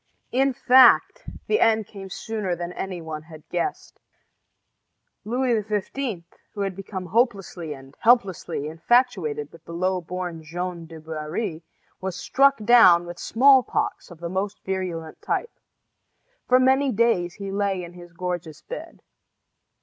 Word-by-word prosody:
In 270 +2 +2
fact, 260 - +5 0.2
the 430 - +1
end 220 -1 +3
came 195 -1 -10
sooner 205 -2 -3
than 175 +1 -5
any 180 -3 -5
one 155 -1 -6
had 155 -1 -14
guessed. 175 - -3 1.2
Louis 240 +1 +1
XV., 210 0 -3 0.3
who 205 - -3
had 195 -2 -2
become 195 -1 -6
hopelessly 195 - -1
and 135 0 -14
helplessly 200 - +2
infatuated 165 - +1
with 165 -1 -16
the 170 - -10
low 185 +1 0
born 175 -1 -5
Jeanne 170 +1 -5
du 165 -1 -10
Barry, 160 +3 -4 0.4
was 190 -1 -4
stricken 270 +5 +2
down 185 -8 +7
with 175 0 -8
smallpox 260 -1 +3
of 175 -3 -13
the 170 - -4
most 190 +3 -3
virulent 180 -4 -4
type. 475 - -2 0.9
For 255 0 +5
many 265 +1 +3
days 200 -7 +1
he 200 -1 -6
lay 195 -2 -1
in 170 0 -10
his 175 -1 -13
gorgeous 175 -3 -5
bed. - - -9
185 Hz, 140 wpm, -24 LUFS, 170-230 Hz, 1.2 s, down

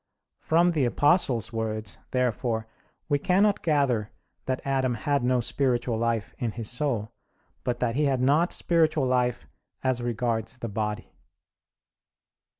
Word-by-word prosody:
From 170 +2 +3
the 150 -6 +1
Apostle's 120 - +2
words, 110 -2 -3
therefore, 125 -2 0 0.4
we 145 -2 +1
cannot 195 +6 +2
gather 135 -9 +1 0.4
that 130 0 -2
Adam 130 -2 +1
had 145 0 0
no 125 0 +2
spiritual 120 -1 0
life 115 -1 -1
in 115 -4 -2
his 115 -3 -3
soul; 120 -5 -1 0.5
but 120 -1 -2
that 120 -2 +1
he 150 +4 +1
had 135 -2 +1
not 145 +7 +3
spiritual 160 -4 +2
life 125 -2 0 0.4
as 130 -2 +1
regards 120 0 -2
the 115 -2 -5
body. 105 +1 -3
125 Hz, 135 wpm, -26 LUFS, 115-140 Hz, 0.5 s, From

